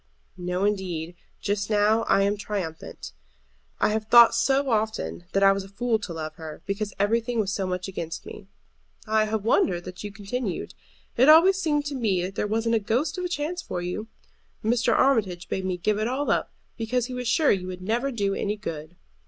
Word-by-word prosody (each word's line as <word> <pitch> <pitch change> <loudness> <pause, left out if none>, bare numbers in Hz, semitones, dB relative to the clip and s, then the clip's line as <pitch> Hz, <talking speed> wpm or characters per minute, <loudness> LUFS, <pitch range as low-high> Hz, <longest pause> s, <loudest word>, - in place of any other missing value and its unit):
"No, 180 +1 -2
indeed; 180 -5 -2 0.3
just 200 0 -1
now 215 +2 +3
I 195 - +4
am 200 +1 +2
triumphant. 185 - -5 0.7
I - - +3
have 215 0 -1
thought 235 0 +8
so 270 0 +2
often 220 -5 -1
that 195 - +3
I 195 - +7
was 195 0 -1
a 195 - -12
fool 225 +2 0
to 205 -3 -6
love 155 -1 -6
her, 160 -2 -9
because 200 +1 -2
everything 230 +3 +1
was 200 -2 0
so 195 -2 -1
much 185 0 -3
against 170 -3 -5
me." 195 - -10 0.6
"I 215 -1 +2
have 215 -1 -2
wondered 180 -6 +2
that 180 +2 -8
you 205 - -5
continued. 200 +1 -4 0.4
It 260 +5 +6
always 370 +5 +7
seemed 295 -4 +1
to 290 - -3
me 210 -9 0
that 185 +2 -4
there 210 - -1
wasn't 225 +2 0
a 225 - +4
ghost 260 - -1
of 360 - -2
a - - -2
chance 345 +2 -2
for 180 - -4
you. 180 +5 -4 0.6
Mr. 235 +3 +2
Armitage 210 -10 +2
bade 190 - -3
me 185 -1 -1
give 210 +4 0
it 215 - 0
all 265 +4 -1
up, - - 0 0.3
because 235 +1 -1
he 255 - -7
was 250 -1 -4
sure 295 +5 +4
you 185 -2 0
would 185 0 -7
never 235 +7 0
do 200 -6 -1
any 205 +2 -2
good." 165 -4 -7
210 Hz, 205 wpm, -25 LUFS, 185-235 Hz, 0.7 s, thought